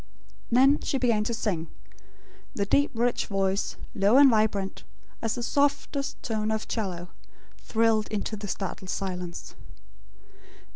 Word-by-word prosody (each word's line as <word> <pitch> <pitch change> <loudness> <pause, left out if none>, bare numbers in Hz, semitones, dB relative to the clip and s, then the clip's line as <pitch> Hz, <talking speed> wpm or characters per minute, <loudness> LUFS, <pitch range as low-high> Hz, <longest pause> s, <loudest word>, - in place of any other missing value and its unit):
Then 265 +4 +5
she 275 - -1
began 235 -5 +2
to 235 - -1
sing. 180 -8 -2 0.9
The 200 - 0
deep 285 +8 +3
rich 240 +1 0
voice, 195 0 0 0.2
low 200 +5 +4
and 280 -2 +8
vibrant, 215 -3 0 0.4
as 225 -1 -1
the 240 - -4
softest 285 +1 0
tone 220 -2 -1
of 220 0 -2
'cello, 180 -5 -3 0.5
thrilled 220 -1 +2
into 215 +1 -3
the 205 0 -6
startled 190 -1 -5
silence. 180 -3 -4
215 Hz, 130 wpm, -27 LUFS, 195-240 Hz, 0.9 s, and